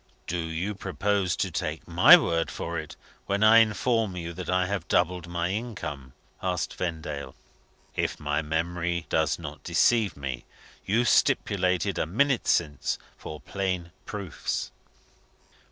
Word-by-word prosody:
"Do 90 - -2
you 85 +5 -2
purpose 95 0 0
to - - -1
take - - -3
my - - +9
word 85 0 0
for 85 0 -4
it 80 - -8 0.3
when 100 +2 +1
I 110 +1 +8
inform 110 -1 +2
you 85 -1 -5
that 90 0 -6
I 90 0 +2
have 95 -3 -3
doubled 90 0 +1
my 85 0 -1
income?" 85 - -5 0.3
asked 90 -4 -1
Vendale. 80 -6 -4 0.6
"If - - -1
my 75 0 0
memory 85 +2 -1
does 80 -1 +1
not 75 -3 -8
deceive 110 -9 +2
me, 65 -3 -4 0.4
you 115 +5 +2
stipulated, 90 -3 +2
a - - 0
minute 130 - +1
since, 75 -2 +1 0.2
for 75 - -8
plain 95 -3 -3 0.2
proofs?" 100 -5 -4
90 Hz, 135 wpm, -27 LUFS, 80-100 Hz, 0.6 s, my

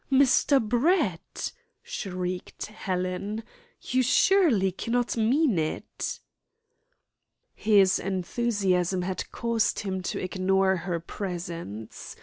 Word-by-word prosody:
"Mr. 270 +1 +5
Brett!" 240 - 0 0.3
shrieked 180 -2 -4
Helen, 195 +1 -3 0.4
"you 255 +1 +1
surely 255 - +4
cannot 240 +6 -1
mean 235 - +2
it." 155 0 -3 1.3
His 200 -3 +4
enthusiasm 190 -2 0
had 185 0 -4
caused 235 -1 0
him 190 -3 -3
to 180 - -3
ignore 190 +1 +2
her 175 -1 -3
presence. 170 - -6
195 Hz, 90 wpm, -27 LUFS, 180-235 Hz, 1.3 s, Mr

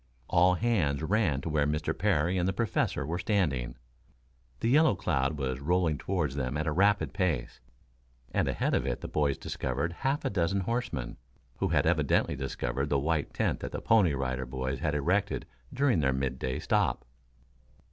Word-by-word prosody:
All 90 +2 +4
hands 90 -10 +1
ran 90 -7 +1
to 80 - -4
where 75 -2 +1
Mr. 75 +1 -1
Parry 85 +6 +1
and 90 -1 +1
the 95 - 0
Professor 105 - 0
were 85 +4 -3
standing. 75 - 0 0.8
The 115 - 0
yellow 150 -2 +5
cloud 75 -5 0
was 65 -2 -2
rolling 85 -1 +1
toward 90 -7 -1
them 65 0 -2
at 80 - -1
a 80 - 0
rapid 100 +5 +2
pace, 80 - -1 0.7
and - - +1
ahead - - 0
of 65 - +1
it - - -2
the - - -5
boys 70 -2 0
discovered 70 +6 -3
half 135 +9 -1
a - - 0
dozen 95 0 +1
horsemen, 90 - -3 0.4
who - - 0
had - - +2
evidently - - +2
discovered 65 0 -3
the 70 - +2
white 75 +2 0
tent - - -1
that - - -6
the - - -2
Pony 100 -10 +3
Rider 65 -1 -2
Boys 65 0 -3
had 75 +1 -1
erected 95 +8 0 0.3
during 135 - +2
their 65 -3 +2
midday 65 -1 -2
stop. - - 0
75 Hz, 175 wpm, -29 LUFS, 65-95 Hz, 0.8 s, yellow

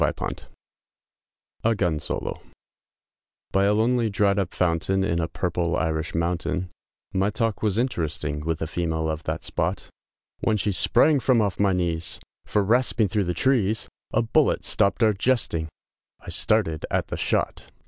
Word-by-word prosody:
BY - - +3 1.5
a 90 -1 -4 0.2
lonely 115 +1 +2
dried 100 -1 +2
up 95 -3 -1
fountain, 90 +2 +1
In 95 -4 0
a 80 - -1
purple 85 -1 -1
Irish 80 -1 -1
mountain, 85 +1 -1 0.4
My 95 +2 +2
talk 110 0 -1
was 105 -2 +1
interesting, 80 - -1
With 80 +1 -2
a - - 0
female 80 -1 -1
of 80 0 -2
that - - -3
spot, - - -2 0.5
When 110 - +1
she 105 +1 0
sprang 95 - +3
from 125 -2 +3
off 100 -3 0
my 100 -2 +3
knees; 85 -2 -2 0.3
For 105 - +1
rasping 115 0 +2
thro' 105 +3 +1
the 90 -2 -1
trees, 110 -5 +1 0.2
A - - +2
bullet 145 +6 +2
stopped 100 +3 +2
our 110 -1 +5
jesting, 100 -7 0 0.5
I - - -9
started 80 -2 +1
at - - -1
the - - -3
shot! - - -1
95 Hz, 145 wpm, -25 LUFS, 85-110 Hz, 1.5 s, our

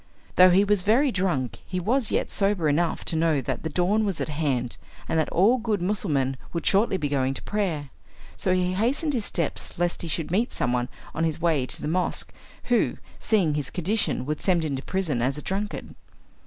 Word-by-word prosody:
Though 185 0 +8
he 185 +3 +5
was 205 -1 +2
very 245 +8 +3
drunk, 140 - -1
he 185 - -4
was 230 +6 +1
yet - - -1
sober 195 -5 +1
enough 160 +3 0
to - - -2
know 160 -2 +2
that - - -3
the 160 - -3
dawn 185 +7 +1
was 195 -5 -2
at - - -2
hand, 140 -6 -1 0.3
and 160 - +1
that 155 - 0
all 220 +9 +4
good 220 -3 -1
Mussulmen 150 -9 0 0.2
would 170 - -3
shortly 195 0 +3
be 150 - -1
going 135 -1 0
to - - -6
prayer. 170 -10 -2 0.4
So 185 - -1
he 180 0 +1
hastened 265 - 0
his 230 -5 -1
steps 165 -4 -2
lest 175 0 0
he 170 - -3
should 165 0 -2
meet 220 +7 +1
some 125 - 0
one 125 0 0 0.2
on 165 - -1
his 160 -1 0
way 160 -6 +1
to - - -4
the - - -2
mosque, 180 +3 -1 0.3
who, 245 -1 +1 0.2
seeing 190 -9 +2
his 145 -3 -2
condition, 190 - 0
would 150 +1 -3
send 175 -4 +2
him 145 -3 -1
to 130 - -4
prison 165 -8 -1
as 135 +4 0
a - - -4
drunkard. 205 +2 -4
175 Hz, 210 wpm, -25 LUFS, 150-200 Hz, 0.4 s, Though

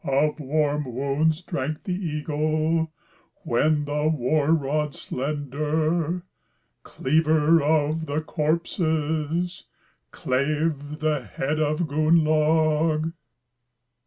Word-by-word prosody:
Of 145 +3 +1
warm 145 -2 -1
wounds 150 +5 0
drank 155 -3 -3
the 190 -3 -2
eagle, 155 -1 -1 0.5
When 150 +5 +1
the 150 +1 0
war 150 +1 +1
rod 150 -1 0
slender, 155 +5 -2 0.6
Cleaver 155 +2 +2
of 155 +1 +1
the 145 +2 -1
corpses, 160 +1 -1 0.4
Clave 150 +2 -1
the 155 -4 0
head 135 - -3
of 155 +1 +1
Gunnlaug." 155 +1 +2
155 Hz, 85 wpm, -24 LUFS, 145-160 Hz, 0.6 s, Cleaver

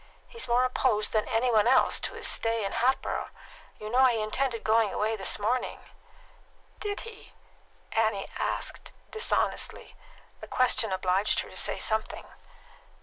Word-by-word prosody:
He's 465 -2 -5
more 245 +1 +3
opposed 235 -4 +1
than 215 -1 0
any 240 +2 +1
one 220 -1 +4
else 255 +1 +4
to - - -4
his - - -3
stay 225 -2 0
in 195 - -3
Hatboro'. 260 +2 0 0.5
You 215 - -8
know 260 +2 +5
he 240 -3 +3
intended 230 +2 -1
going 220 -2 +3
away 220 +1 -1
this 195 -3 0
morning?" 230 +5 -1 1.0
"Did 410 -1 -3
he?" 455 -1 -12 0.6
Annie 220 -3 0
asked - - -3 0.2
dishonestly. 440 0 0 0.4
The - - -10
question 245 -4 +2
obliged 190 +2 +1
her - - -10
to - - -13
say - - +1
something. 220 -1 -2
225 Hz, 145 wpm, -28 LUFS, 215-255 Hz, 1.0 s, know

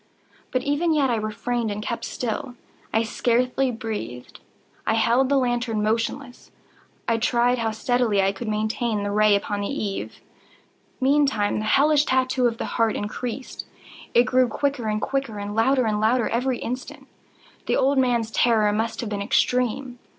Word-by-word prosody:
But 255 - -1
even 310 +3 +1
yet 275 -4 +2
I - - +2
refrained 225 +2 -2
and 205 0 -3
kept 235 +2 -3
still. 245 +1 -4 0.4
I 225 - +2
scarcely 250 +3 +1
breathed. 215 - -6 0.5
I 220 - +2
held 235 +4 +3
the 280 - +3
lantern 240 -4 0
motionless. 235 +4 -2 0.6
I 230 - +2
tried 240 +2 +2
how 225 -1 0
steadily 220 -1 +1
I 195 0 +3
could 210 +4 -7
maintain 215 0 -1
the 205 - -2
ray 210 0 +4
upon 205 0 -2
the 200 - -2
eve. 210 -8 -4 0.8
Meantime 265 -7 +2
the 215 - -3
hellish 290 +5 +4
tattoo 255 -1 +2
of 230 -1 -3
the - - -3
heart 225 -2 0
increased. 240 +5 -5 0.5
It 240 - +7
grew 255 0 +3
quicker 265 0 -2
and 215 0 0
quicker, 270 -4 -2
and 205 0 -5
louder 255 +3 +3
and 210 -1 0
louder 230 +2 +2
every 250 +2 0
instant. 250 +2 -6 0.6
The - - +2
old 270 +1 +3
man's 240 -3 +1
terror 220 -3 +3
must 220 +2 -2
have 230 - -4
been 200 -1 -2
extreme! 250 +3 0
235 Hz, 165 wpm, -24 LUFS, 215-255 Hz, 0.8 s, It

